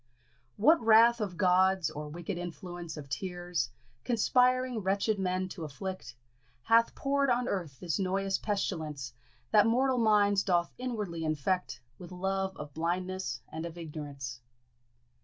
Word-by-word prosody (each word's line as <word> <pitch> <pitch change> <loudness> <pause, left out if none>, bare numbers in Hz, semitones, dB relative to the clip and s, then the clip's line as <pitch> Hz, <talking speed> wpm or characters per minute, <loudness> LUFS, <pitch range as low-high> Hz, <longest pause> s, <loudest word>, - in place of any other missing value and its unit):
What 300 +7 +5
wrath 230 +1 +6
of 190 -5 -3
gods, 185 -1 +3
or 150 0 -6
wicked 170 +3 -5
influence 175 -1 -6
Of 145 -2 -8
tears, 175 -4 -3 0.3
conspiring 250 +1 +2
wretched 200 +2 0
men 185 0 0
t' 180 - -9
afflict, 185 +5 -6 0.5
Hath 230 - +4
pour'd 275 0 +1
on 245 0 +1
earth 165 -9 -3
this 170 -2 -2
noyous 195 +1 0
pestilence 155 - -3 0.4
That 210 0 +6
mortal 255 +2 +2
minds 205 -3 +4
doth 175 -4 +1
inwardly 210 -10 -3
infect 155 -2 -1 0.2
With 180 -1 -10
love 190 +1 -2
of 150 -1 -8
blindness 180 +4 -2
and 160 +1 -5
of 170 0 -7
ignorance? 145 -6 -6
185 Hz, 135 wpm, -30 LUFS, 165-210 Hz, 0.5 s, wrath